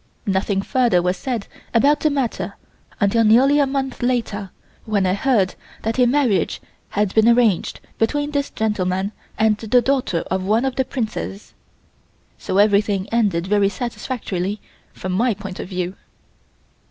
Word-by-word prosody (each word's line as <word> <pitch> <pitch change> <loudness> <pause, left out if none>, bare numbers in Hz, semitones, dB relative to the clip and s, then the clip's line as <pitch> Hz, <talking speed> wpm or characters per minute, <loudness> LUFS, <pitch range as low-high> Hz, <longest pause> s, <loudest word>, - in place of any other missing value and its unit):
Nothing 195 0 0
further 240 -8 +2
was 180 +1 0
said 235 -1 -3 0.3
about 285 +6 +4
the 310 - +2
matter 275 -5 -2 0.4
until 215 +3 +3
nearly 260 +7 +5
a 285 - +3
month 270 -1 -3
later 230 -5 -1 0.4
when 205 -3 +1
I 185 - +2
heard 205 -3 +1 0.3
that 225 +3 -1
a 250 - +5
marriage 250 -6 +1 0.3
had 205 -1 0
been 220 +1 +5
arranged 235 -6 +2 0.2
between 290 +6 0
this 285 -1 -1
gentleman 195 -2 -1 0.3
and 215 -1 +3
the 225 +3 +3
daughter 255 -9 0
of 190 0 0
one 220 +6 +2
of 265 -1 -1
the 265 - +1
princes. 210 - -5 0.9
So 185 - -2
everything 205 -1 +3
ended 205 -7 +1
very 200 0 +2
satisfactorily 210 -4 -4 0.3
from 185 - -5
my 225 +4 +1
point 195 -2 -8
of - - -6
view. 180 0 -3
215 Hz, 150 wpm, -21 LUFS, 195-250 Hz, 0.9 s, nearly